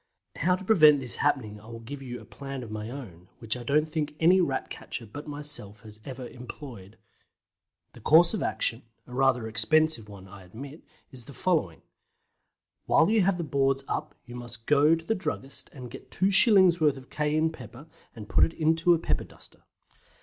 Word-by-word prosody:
How 180 +4 +2
to 190 - -9
prevent 155 -9 +6
this 125 -3 +1
happening 115 -8 -1
I 110 - -16
will 115 0 -8
give 135 +5 -9
you 125 -2 -7
a - - -14
plan 135 -2 -7
of 110 - -9
my 110 +1 -5
own, 95 -10 -10
which 115 0 -3
I 125 - -7
don't 150 +5 +1
think 150 -1 -3
any 180 +3 +5
Rat 135 -6 -2
catcher 115 - -7
but 145 +9 -10
myself 145 -8 -2
has 110 -1 -13
ever 130 -2 -7
employed. 120 -5 -11 1.0
The - - -14
course 165 +4 +5
of 215 - -2
action 115 +2 -1 0.2
a 125 - -13
rather 130 -3 +2
expensive 110 +2 +1
one 100 -2 -12
I 95 +1 -13
admit 135 - -10 0.3
is 125 -4 -11
the 140 - -12
following: 150 - -1 1.0
While 165 +6 +4
you 220 -1 +4
have 190 -1 +2
the 170 - -3
boards 135 -2 0
up - - -4
you 120 - -11
must 120 -1 -9
go 150 +2 +4
to 165 0 -9
the 225 - +1
druggist 140 -9 -1
and 125 -4 -10
get 135 - -11
two 190 +1 +1
shillings' 190 -4 +5
worth 150 -3 +3
of 130 - -14
cayenne 155 +1 0
pepper, 125 -1 -12 0.3
and 105 -3 -9
put - - +3
it 165 - +1
into 165 +2 +3
a - - 0
pepper 160 - -2
duster. - - -18
135 Hz, 195 wpm, -27 LUFS, 115-155 Hz, 1.0 s, prevent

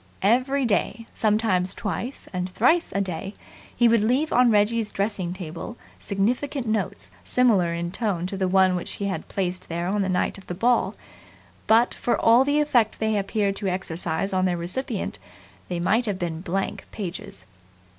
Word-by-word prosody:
Every 255 +6 +3
day, 230 +2 0
sometimes 210 -4 +1
twice 235 +5 -4
and 180 0 -2
thrice 320 - +2
a 200 - +2
day, 190 +1 -4 0.4
he 240 - +4
would 230 -1 +4
leave 255 +8 +1
on 250 0 +5
Reggie's 215 +1 +2
dressing 195 -3 -2
table 180 +5 -7 0.2
significant 245 +7 -1
notes 190 - -2
similar 185 - +2
in 170 0 -3
tone 195 -5 -1
to 190 - -4
the 190 -1 0
one 185 0 +4
which 180 - -2
he 200 - -4
had 195 -1 -3
placed 185 -1 -3
there 170 +1 -2
on 200 +3 0
the 190 - 0
night 185 +2 0
of 190 - -17
the 175 - -4
ball; 240 +6 +2 0.7
but, 230 +2 +4
for 240 - 0
all 235 +3 +6
the 285 +2 +2
effect 250 -8 +2
they 220 -1 0
appeared 200 0 0
to 205 - -3
exercise 180 0 -1
on 185 0 +2
their 180 -1 +1
recipient, 200 +6 -4 0.5
they 175 -1 -3
might 220 +7 +2
have 200 -3 -1
been 170 -3 -3
blank 195 +2 -3
pages. 175 - -7
200 Hz, 175 wpm, -24 LUFS, 180-230 Hz, 0.7 s, all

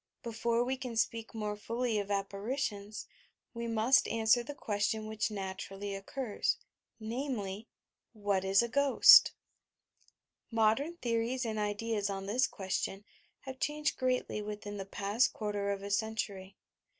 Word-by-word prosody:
Before 235 0 0
we 260 +1 -2
ean 245 -3 -5
speak 230 0 -1
more 210 -1 -2
fully 230 +1 -1
of 200 0 -4
apparitions, 205 +1 -3 0.5
we 235 0 -4
must 230 +3 +4
answer 225 +1 +3
the 280 +5 -7
question 215 0 -1
which 215 0 -1
natu 190 -2 -5
rally 200 +1 -5
occurs; 210 +3 -2 0.4
namely: 220 -3 -4 0.5
WHAT 205 -3 0
IS 195 +3 +4
A - - -1
"GHOST"t 280 +3 +7 1.2
Modern 230 +9 +2
theories 240 0 -1
and 220 -1 -2
ideas 210 0 -1
on 195 -1 -4
this 240 +6 +2
question 195 +1 -3 0.4
have 265 -1 -8
changed 300 -1 0
greatly 255 -4 -1
within 205 0 -6
the 195 - -5
past 205 +5 +1
quarter 205 -2 -2
of 200 0 -2
a 200 - -5
century. 200 -2 -2
220 Hz, 140 wpm, -32 LUFS, 200-235 Hz, 1.2 s, GHOST"t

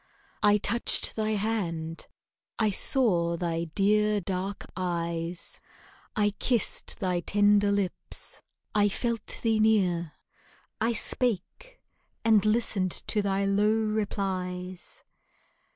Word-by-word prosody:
I 210 -1 +5
touched 235 +3 0
thy 215 0 0
hand, 175 -7 -2 0.5
I 215 -2 +2
saw 180 -8 +1
thy 170 -1 -1
dear, 210 +1 +3
dark 190 +1 -4
eyes, 170 -1 -3 0.6
I 210 -1 +2
kissed 240 -4 0
thy 180 -2 0
tender 205 +2 +3
lips, 200 -2 -3 0.3
I 205 -1 +4
felt 230 +2 -2
thee 225 -1 +2
near, 185 -7 +2 0.7
I 230 +2 +2
spake, 250 - -1 0.5
and 220 -3 +5
listened 215 -4 +1
to 210 - +2
thy 200 0 0
low 205 +2 +3
replies. 190 -4 -2
205 Hz, 105 wpm, -28 LUFS, 180-215 Hz, 0.7 s, I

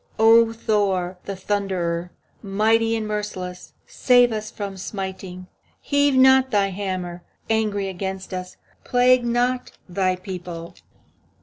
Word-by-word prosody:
O 225 +1 +6
Thor, 195 -5 0
the 200 - -4
Thunderer, 185 -3 -2 0.3
Mighty 225 +3 +2
and 220 -1 -3
merciless, 195 -4 -5
Spare 245 -2 +3
us 215 0 -4
from 200 -3 -6
smiting! 190 -1 -6 0.3
Heave 285 -1 +2
not 265 0 +6
thy 200 -4 +2
hammer, 185 -2 -4 0.3
Angry, 210 -3 0
against 190 0 -5
us; 185 0 -6 0.3
Plague 250 0 +4
not 245 +1 0
thy 185 0 0
people. 180 -3 -7
200 Hz, 115 wpm, -23 LUFS, 185-225 Hz, 0.3 s, O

